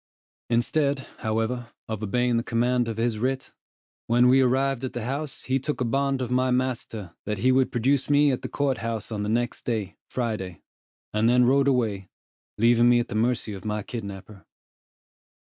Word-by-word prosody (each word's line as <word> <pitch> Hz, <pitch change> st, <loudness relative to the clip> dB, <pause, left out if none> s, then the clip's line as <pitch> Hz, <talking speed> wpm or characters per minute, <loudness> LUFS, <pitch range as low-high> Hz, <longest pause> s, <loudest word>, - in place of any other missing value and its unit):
Instead, 135 Hz, +3 st, +1 dB
however, 115 Hz, +2 st, -2 dB, 0.2 s
of 110 Hz, -2 st, -4 dB
obeying 120 Hz, +3 st, +1 dB
the -, -, +1 dB
command 120 Hz, +1 st, +1 dB
of 115 Hz, -1 st, -4 dB
his 115 Hz, -1 st, 0 dB
writ, 130 Hz, +3 st, -2 dB, 0.6 s
when 120 Hz, +2 st, +4 dB
we 135 Hz, +1 st, +6 dB
arrived 130 Hz, 0 st, +1 dB
at 130 Hz, -, -3 dB
the 120 Hz, -, -4 dB
house 140 Hz, +3 st, -4 dB
he 130 Hz, +1 st, 0 dB
took 150 Hz, +3 st, -3 dB
a 125 Hz, -, 0 dB
bond 135 Hz, +2 st, 0 dB
of 125 Hz, -, -5 dB
my 130 Hz, +1 st, +2 dB
master 120 Hz, -7 st, -2 dB
that 105 Hz, -1 st, -1 dB
he 125 Hz, +7 st, +3 dB
would 130 Hz, 0 st, +3 dB
produce 135 Hz, +4 st, +1 dB
me 145 Hz, 0 st, +5 dB
at 130 Hz, -, -2 dB
the -, -, -5 dB
court 140 Hz, -2 st, 0 dB
house 115 Hz, -1 st, -4 dB
on 105 Hz, -2 st, -2 dB
the 105 Hz, -, -2 dB
next 120 Hz, +2 st, -1 dB
day, 110 Hz, -5 st, -2 dB
Friday, 105 Hz, -9 st, -3 dB, 0.5 s
and 110 Hz, +2 st, +3 dB
then 125 Hz, 0 st, +5 dB
rode 135 Hz, +2 st, +3 dB
away, 110 Hz, -8 st, 0 dB, 0.5 s
leaving 120 Hz, +2 st, +5 dB
me 120 Hz, 0 st, +5 dB
at 120 Hz, -, -2 dB
the -, -, -5 dB
mercy 115 Hz, 0 st, 0 dB
of 95 Hz, -, -8 dB
my 105 Hz, -1 st, -2 dB
kidnapper. 100 Hz, -3 st, -8 dB
120 Hz, 185 wpm, -25 LUFS, 110-130 Hz, 0.6 s, we